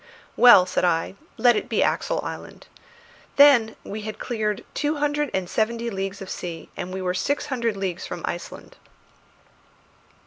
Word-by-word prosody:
"Well," 240 Hz, -7 st, +8 dB
said 185 Hz, -, -1 dB
I, 165 Hz, -1 st, +1 dB, 0.2 s
"let 240 Hz, +1 st, +5 dB
it -, -, -3 dB
be -, -, +2 dB
Axel -, -, 0 dB
Island. -, -, -8 dB, 0.7 s
Then 260 Hz, -6 st, +6 dB
we 215 Hz, +2 st, -6 dB
had 215 Hz, 0 st, -6 dB
cleared 215 Hz, -4 st, -3 dB
two 295 Hz, +1 st, -1 dB
hundred 295 Hz, 0 st, 0 dB
and 190 Hz, -2 st, -2 dB
seventy 235 Hz, +4 st, -1 dB
leagues 195 Hz, 0 st, -4 dB
of 190 Hz, -, -10 dB
sea, 170 Hz, -2 st, -6 dB
and 180 Hz, -, -5 dB
we 190 Hz, 0 st, -4 dB
were 180 Hz, 0 st, 0 dB
six 285 Hz, +10 st, -1 dB
hundred 230 Hz, -4 st, -1 dB
leagues 185 Hz, -2 st, -4 dB
from 175 Hz, -1 st, -7 dB
Iceland." 175 Hz, 0 st, -7 dB
215 Hz, 160 wpm, -24 LUFS, 185-240 Hz, 0.7 s, Well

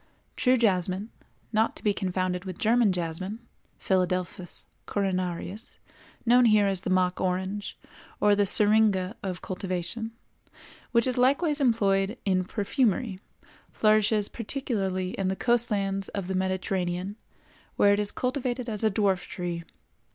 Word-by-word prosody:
True 255 Hz, 0 st, +3 dB
jasmine—not 210 Hz, +2 st, -1 dB
to -, -, -11 dB
be 210 Hz, -, +3 dB
confounded 185 Hz, -1 st, -2 dB
with 185 Hz, -2 st, -6 dB
German 225 Hz, -1 st, +3 dB
jasmine 180 Hz, +4 st, -3 dB, 0.4 s
(Philadelphus 180 Hz, -1 st, -1 dB, 0.2 s
coronarius, 185 Hz, +1 st, -3 dB, 0.5 s
known 245 Hz, +1 st, +6 dB
here 215 Hz, -2 st, +5 dB
as 195 Hz, -2 st, 0 dB
the -, -, -4 dB
mock 185 Hz, -1 st, +1 dB
orange, 190 Hz, +2 st, -2 dB, 0.4 s
or 210 Hz, 0 st, +4 dB
the 205 Hz, 0 st, +2 dB
Syringa 210 Hz, -1 st, +3 dB
of 185 Hz, -2 st, -5 dB
cultivation) 190 Hz, +4 st, -4 dB, 0.8 s
which 235 Hz, -1 st, +3 dB
is 255 Hz, -1 st, 0 dB
likewise 285 Hz, +4 st, +2 dB
employed 205 Hz, -3 st, +2 dB
in 185 Hz, -2 st, +1 dB
perfumery—flourishes 215 Hz, -1 st, 0 dB
particularly 200 Hz, -7 st, -2 dB
in 195 Hz, -, 0 dB
the 190 Hz, -, 0 dB
coast 240 Hz, +2 st, +2 dB
lands 195 Hz, -2 st, -1 dB
of 200 Hz, -3 st, -4 dB
the 190 Hz, -, -3 dB
Mediterranean, 185 Hz, 0 st, -1 dB, 0.6 s
where 200 Hz, 0 st, +5 dB
it 200 Hz, -, +1 dB
is 205 Hz, -1 st, 0 dB
cultivated 250 Hz, -1 st, -2 dB
as 215 Hz, -2 st, -2 dB
a 220 Hz, -, +4 dB
dwarf 195 Hz, -3 st, +1 dB
tree. 175 Hz, -2 st, -4 dB
200 Hz, 130 wpm, -27 LUFS, 185-225 Hz, 0.8 s, known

